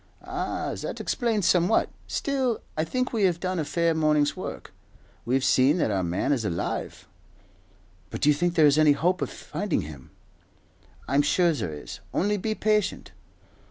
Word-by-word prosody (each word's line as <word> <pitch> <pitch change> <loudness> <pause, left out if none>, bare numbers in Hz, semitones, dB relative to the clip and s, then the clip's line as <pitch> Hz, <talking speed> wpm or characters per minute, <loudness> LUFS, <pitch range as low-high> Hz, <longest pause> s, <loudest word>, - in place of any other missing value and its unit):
"Ah, - - -3
that - - -5
explains 225 -6 0
somewhat. 180 +4 +3 0.2
Still, 265 -5 -1
I 155 - 0
think 255 +10 -2
we 215 -4 +2
have 175 -2 +1
done 185 0 -2
a - - 0
fair 170 +2 +1
morning's 150 -2 +2
work. - - -7 0.5
We've 130 +2 +1
seen 135 +6 +4
that 135 - +1
our 95 -2 0
man 85 +8 -1
is 130 -6 +1
alive." 85 -5 -3 1.0
"But - - -6
do 150 - +4
you - - +6
think 175 +4 0
there 160 -3 +6
is 145 +1 +5
any 150 -1 +6
hope 180 +5 0
of - - -1
finding - - -3
him?" 75 -3 -10 1.0
"I'm 140 +1 +3
sure 170 +3 +3
there 115 - -3
is, 75 - -9 0.2
only 205 +2 +1
be 215 +3 -2
patient." 215 -2 0
165 Hz, 170 wpm, -26 LUFS, 145-195 Hz, 1.0 s, you